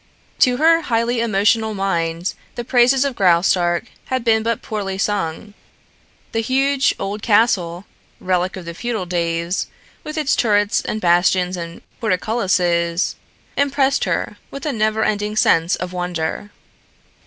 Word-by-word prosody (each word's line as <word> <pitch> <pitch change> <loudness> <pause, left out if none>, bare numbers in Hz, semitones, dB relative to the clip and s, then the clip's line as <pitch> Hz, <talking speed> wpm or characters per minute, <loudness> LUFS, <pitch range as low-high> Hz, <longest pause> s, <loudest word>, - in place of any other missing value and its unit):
To 250 -1 +4
her 330 +3 +4
highly 235 -2 0
emotional 220 0 +1
mind, 170 -3 -1 0.2
the 240 - -4
praises 255 +2 +3
of 275 - -1
Graustark 175 -1 +2 0.2
had 260 -2 -2
been 225 -1 +3
but 230 0 -2
poorly 195 -3 -4
sung. 200 0 -2 0.8
The 225 - -1
huge 270 +3 +1
old 205 +2 -4
castle, 200 -5 +2 0.3
relic 185 0 -1
of 180 - -8
the 170 - -6
feudal 220 0 -3
days, 170 0 -1 0.4
with 305 +1 -6
its 300 -3 +1
turrets 205 -2 +2
and 215 - -3
bastions 180 +1 +2
and 170 -1 -8 0.2
portcullises, 180 -5 0 0.4
Impressed 280 -1 +1
her - - -2
with 275 - -8
a 295 - -1
never 215 -1 +1
ending 210 0 -1
sense 165 -5 +3
of 180 0 -6
wonder. 180 +2 -3
205 Hz, 135 wpm, -19 LUFS, 180-235 Hz, 0.8 s, To